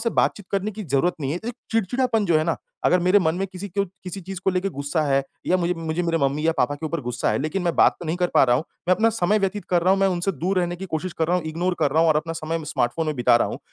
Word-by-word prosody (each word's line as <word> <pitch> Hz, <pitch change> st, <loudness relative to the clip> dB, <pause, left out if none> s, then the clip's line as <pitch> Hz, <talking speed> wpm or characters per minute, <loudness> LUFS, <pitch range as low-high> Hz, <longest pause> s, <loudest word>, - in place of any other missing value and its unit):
से 230 Hz, -, 0 dB
बातचीत 205 Hz, -2 st, 0 dB
करने 200 Hz, +2 st, 0 dB
की 215 Hz, 0 st, -7 dB
ज़रूरत 145 Hz, +5 st, +1 dB
नहीं 135 Hz, -1 st, -2 dB
है, 175 Hz, -, -2 dB
एक 240 Hz, -, -3 dB, 0.2 s
चिड़चिड़ापन 225 Hz, +1 st, +1 dB
जो 165 Hz, -3 st, +4 dB
है 155 Hz, -, 0 dB
ना 165 Hz, -, 0 dB, 0.3 s
अगर 180 Hz, -, +4 dB
मेरे 185 Hz, +4 st, +5 dB
मन 160 Hz, -1 st, +1 dB
में 195 Hz, -, -1 dB
किसी 190 Hz, +2 st, -7 dB
को 200 Hz, +2 st, 0 dB, 0.2 s
किसी 185 Hz, +2 st, -6 dB
चीज़ 190 Hz, +1 st, -7 dB
को -, -, +4 dB
लेके 185 Hz, +1 st, 0 dB
गुस्सा 145 Hz, +3 st, -2 dB
है 135 Hz, 0 st, +2 dB, 0.2 s
या 185 Hz, -, +3 dB
मुझे 175 Hz, 0 st, 0 dB
मुझे 165 Hz, +1 st, -2 dB
मेरे 165 Hz, -1 st, 0 dB
मम्मी 140 Hz, +3 st, 0 dB
या 165 Hz, -, +4 dB
पापा 145 Hz, -, +2 dB
के 160 Hz, +2 st, -5 dB
ऊपर 165 Hz, +1 st, -3 dB
गुस्सा 125 Hz, -4 st, -1 dB
है। 110 Hz, -, 0 dB
लेकिन 155 Hz, +6 st, -2 dB
मैं 170 Hz, -2 st, 0 dB
बात -, -, +5 dB
तो 175 Hz, -, -6 dB
नहीं 160 Hz, -, -1 dB
कर 180 Hz, 0 st, +1 dB
पा -, -, +6 dB
रहा 120 Hz, -1 st, +3 dB
हूँ, 150 Hz, -, -2 dB, 0.2 s
मैं 185 Hz, -, +6 dB
अपना 225 Hz, +3 st, +3 dB
समय 210 Hz, 0 st, +1 dB
व्यतीत 195 Hz, +1 st, -1 dB
कर 175 Hz, -1 st, +3 dB
रहा 185 Hz, -, +3 dB
हूँ, 195 Hz, -, +1 dB
मैं 195 Hz, -, +4 dB
उनसे 180 Hz, +2 st, -1 dB
दूर 185 Hz, +6 st, -1 dB
रहने 175 Hz, 0 st, -2 dB
की 190 Hz, +2 st, -7 dB
कोशिश 175 Hz, +2 st, -3 dB
कर 160 Hz, -, +2 dB
रहा 180 Hz, -, +3 dB
हूँ, 170 Hz, -, -3 dB
इग्नोर 175 Hz, +3 st, -1 dB
कर 140 Hz, -, +3 dB
रहा 155 Hz, +3 st, +3 dB
हूँ 165 Hz, -, +4 dB
और 155 Hz, -, +4 dB
अपना 165 Hz, +2 st, -2 dB
समय 165 Hz, 0 st, -3 dB
म 160 Hz, -, -8 dB
स्मार्टफ़ोन 150 Hz, +2 st, -1 dB
में 155 Hz, -, -1 dB
बिता 120 Hz, -1 st, +4 dB
रहा -, -, +1 dB
हूँ, -, -, -5 dB
175 Hz, 320 wpm, -23 LUFS, 155-190 Hz, 0.3 s, पा